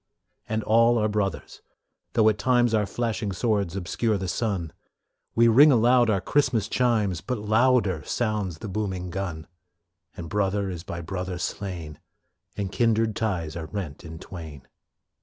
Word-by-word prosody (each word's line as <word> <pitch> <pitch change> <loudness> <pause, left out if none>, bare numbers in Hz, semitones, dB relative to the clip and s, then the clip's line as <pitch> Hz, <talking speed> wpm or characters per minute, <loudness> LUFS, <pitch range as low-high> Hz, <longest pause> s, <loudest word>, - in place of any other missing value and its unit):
And 110 0 -1
all 115 +2 +4
are 110 -1 +2
brothers, 105 -2 -3 0.5
though 110 -1 +4
at 105 -1 -1
times 120 +1 +3
Our 105 -2 +2
flashing 110 -1 -2
swords 100 -2 0
obscure 100 +3 -1
the 95 -1 -4
sun. 95 -5 -2 0.6
We 115 0 +5
ring 140 +7 +7
aloud 120 0 +4
our 100 -3 +2
Christmas 125 -3 +1
chimes, 110 -9 +1
But 125 -1 -3
louder 110 -4 +2
sounds 105 -7 -2
the 110 - -7
booming 95 -3 -3
gun, 85 -4 -4 0.7
And 85 - -6
brother 100 0 0
is 85 -2 -6
by 85 - -6
brother 90 +1 -4
slain, 90 -5 -5 0.6
And 100 -2 -3
kindred 115 -2 +1
ties 90 -8 -2
are 80 -2 -5
rent 85 -5 -6
in 80 -1 -9
twain. 80 -6 -10
105 Hz, 150 wpm, -25 LUFS, 90-115 Hz, 0.7 s, ring